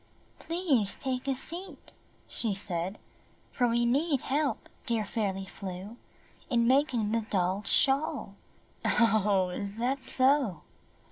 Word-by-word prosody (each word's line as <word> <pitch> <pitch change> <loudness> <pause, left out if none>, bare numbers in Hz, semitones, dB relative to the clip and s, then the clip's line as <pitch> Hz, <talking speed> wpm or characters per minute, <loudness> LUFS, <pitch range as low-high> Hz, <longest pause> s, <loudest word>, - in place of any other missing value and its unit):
"Please 305 - +2
take 260 -1 -3
a 270 - +1
seat," 340 +8 -7 0.4
she 220 -4 -2
said, 190 0 -3 0.5
"for 245 - +1
we 235 0 +2
need 280 +3 +1
help, 285 +1 -1 0.2
dear 230 -3 0
Fairly 195 -3 -2
Flew, 190 +2 -7 0.5
in 235 -1 +2
making 250 -4 +2
the 230 0 +1
doll's 190 +1 0
shawl." 275 -5 +2 0.5
"Oh, 210 -5 +3
is 200 +3 -5
that 260 +4 -1
so?" 260 - +3
235 Hz, 120 wpm, -29 LUFS, 200-270 Hz, 0.5 s, Oh